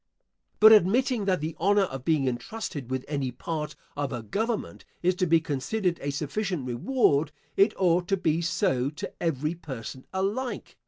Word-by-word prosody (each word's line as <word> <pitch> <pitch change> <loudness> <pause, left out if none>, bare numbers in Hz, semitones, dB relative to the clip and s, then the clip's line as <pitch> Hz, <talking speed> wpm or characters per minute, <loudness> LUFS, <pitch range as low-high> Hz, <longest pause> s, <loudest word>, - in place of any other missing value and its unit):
But 220 +1 +9
admitting 220 +3 +4
that 185 -4 +1
the 155 +1 -3
honour 200 +4 +4
of 135 -8 -5
being 150 -3 +2
entrusted 130 - -4
with 130 0 -2
any 140 -3 -1
part 150 +4 -4 0.2
of 145 -1 -2
a 120 -3 -4
government 220 - -3 0.2
is 180 +1 +4
to 185 - +1
be 165 0 +5
considered 170 +5 -1
a 145 - -2
sufficient 155 +3 -2
reward, 145 - +2 0.2
it 200 +2 +4
ought 175 -1 +3
to 195 - +1
be 165 -2 +1
so 165 -6 +1
to 150 - -7
every 155 -1 0
person 130 -6 -8
alike. 200 +7 -2
165 Hz, 165 wpm, -27 LUFS, 140-195 Hz, 0.2 s, But